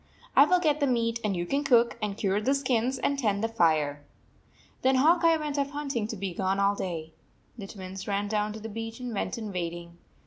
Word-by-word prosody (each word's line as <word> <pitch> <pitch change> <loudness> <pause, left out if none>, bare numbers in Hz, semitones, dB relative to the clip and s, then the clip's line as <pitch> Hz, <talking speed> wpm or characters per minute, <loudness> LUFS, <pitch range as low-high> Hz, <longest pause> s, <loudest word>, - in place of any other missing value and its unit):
I 280 - +8
will 360 +3 +3
get 305 -4 +1
the 285 - +2
meat, 230 -2 0
and 205 -3 0
you 175 - -2
can 280 +10 0
cook, 240 -4 +4
and 210 -1 -2
cure 200 0 0
the 270 +6 +2
skins, 255 -1 0
and 280 +2 -1
tend 210 -4 0
the - - +2
fire." 155 -9 +1 0.8
Then 260 +1 +3
Hawk 330 +6 +4
Eye 330 -1 +5
went 295 -2 -3
off 280 0 0
hunting, 280 -7 -3
to 225 - -5
be 190 -2 -4
gone 190 +2 0
all 200 0 +3
day. 165 -5 -5 0.4
The 205 -5 -8
Twins 190 -1 -8
ran 200 0 -1
down 210 0 0
to 220 - -7
the 220 - -7
beach 225 +2 -6
and 250 -2 -5
went 205 - -2
in 215 -3 -5
wading. 170 -1 -5
220 Hz, 230 wpm, -28 LUFS, 195-265 Hz, 0.8 s, I